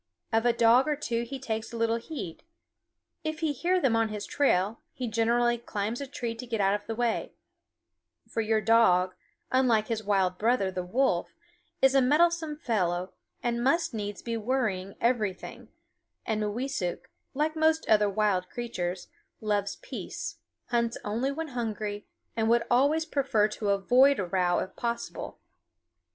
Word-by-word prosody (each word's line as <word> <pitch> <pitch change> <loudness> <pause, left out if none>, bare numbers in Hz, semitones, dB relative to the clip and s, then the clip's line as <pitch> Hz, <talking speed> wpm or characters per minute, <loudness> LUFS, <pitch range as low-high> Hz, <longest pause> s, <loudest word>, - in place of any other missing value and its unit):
Of 225 +2 +3
a - - +6
dog 235 +3 +5
or 300 - +1
two 235 -5 -2
he 270 +3 -6
takes 230 -3 -4
little 230 0 +1
heed. 235 - -7 0.8
If 315 0 -3
he 310 -2 +1
hear 360 +7 +1
them 265 -9 +2
on 225 -1 +2
his 210 -1 -5
trail, 215 -6 +1
he 250 - -4
generally 235 +1 +2
climbs 220 +2 -3
a 280 - -4
tree 245 -4 -4
to 240 +2 -8
get 230 -2 -2
out 195 0 +3
of 205 0 -3
the 225 - -3
way; 235 -1 -1 0.9
for 225 - -2
your 220 0 +1
dog, 185 -5 +4 0.4
unlike 245 -4 +3
his 220 -1 -2
wild 190 -3 +1
brother, 220 -4 +2
the 185 - -3
wolf, 180 -1 0 0.5
is 265 0 +6
a 270 - +5
meddlesome 315 +3 +2
fellow 185 - -1 0.3
and 235 0 0
must 305 +4 +2
needs 205 -3 -5
be 230 -1 -2
worrying 215 -5 -1
everything; 220 -6 -1 0.6
and 220 -2 -1
Mooweesuk, 210 -4 -2 0.3
like 305 +3 0
most 315 0 +2
other 210 -1 +4
wild 195 -3 +1
creatures, 185 -7 -4 0.3
loves 205 -2 -1
peace, - - -6 0.3
hunts 235 -1 0
only 230 +6 -1
when 320 +2 -4
hungry, 215 -4 -4 0.3
and 225 -1 +1
would 235 0 +4
always 285 +6 +3
prefer 260 -9 +2
to 210 -1 -3
avoid 250 +8 +5
a 190 - -1
row 175 0 +1
if - - -3
possible. 235 0 -4
230 Hz, 160 wpm, -28 LUFS, 205-260 Hz, 0.9 s, a